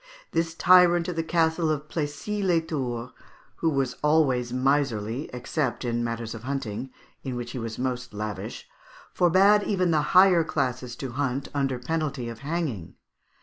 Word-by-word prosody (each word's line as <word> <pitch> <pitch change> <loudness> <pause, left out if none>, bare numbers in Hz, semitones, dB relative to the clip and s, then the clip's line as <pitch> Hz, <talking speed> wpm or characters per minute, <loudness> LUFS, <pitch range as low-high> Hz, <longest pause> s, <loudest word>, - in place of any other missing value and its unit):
This 165 0 -1
tyrant 175 -1 +5
of 180 - -3
the 165 - 0
Castle 160 0 +1
of 150 -1 -2
Plessis 165 +8 -3
les 175 -3 +3
Tours, 125 -6 -4 0.5
who 165 - +1
was 135 -4 -1
always 140 -6 +2
miserly, 130 -2 0
except 125 +1 -2
in 120 0 -1
matters 115 -1 -3
of 115 - -8
hunting, 130 -2 -4 0.3
in 130 -2 -4
which 120 0 -5
he 125 - -5
was 115 -1 -5
most 125 -1 -3
lavish, 105 -2 -6 0.5
forbade 190 +4 +5
even 185 -4 +1
the 155 -2 +3 0.2
higher 185 -3 +7
classes 125 -5 -2
to 135 -3 -6
hunt 135 +1 -2
under 135 -3 0
penalty 140 -2 -2
of 115 -1 -8
hanging. 140 - -3
140 Hz, 155 wpm, -26 LUFS, 120-165 Hz, 0.5 s, higher